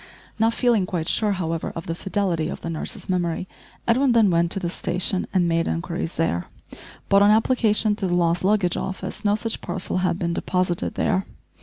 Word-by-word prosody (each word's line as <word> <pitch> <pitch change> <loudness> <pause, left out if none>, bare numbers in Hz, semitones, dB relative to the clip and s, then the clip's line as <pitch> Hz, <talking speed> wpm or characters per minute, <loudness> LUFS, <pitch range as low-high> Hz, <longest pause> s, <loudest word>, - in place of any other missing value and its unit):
Not 225 +1 +2
feeling 235 -7 +2
quite 165 -3 -3
sure 210 -2 +2
however 165 -3 -3
of 165 - -5
the 165 - -2
fidelity 175 -3 -1
of - - -6
the 165 - -4
nurse's 160 - -5
memory, 180 -1 -1 0.4
Edwin 250 +2 +3
then 220 -5 +4
went 170 0 +2
to - - -2
the 180 - -2
station 180 +2 0
and 180 -3 +2
made 165 0 +1
inquiries 170 0 -3
there, 90 - -1 0.6
but 200 0 +5
on 205 - +6
application 220 -1 +3
to 195 - -1
the 175 - 0
lost 170 0 +1
luggage 195 -3 +2
office 190 +2 -5
no 205 -1 +3
such 225 +1 -3
parcel 175 - -3
had 180 -2 +1
been 170 -2 -1
deposited 180 0 -1
there. 190 - 0
185 Hz, 190 wpm, -23 LUFS, 170-210 Hz, 0.6 s, on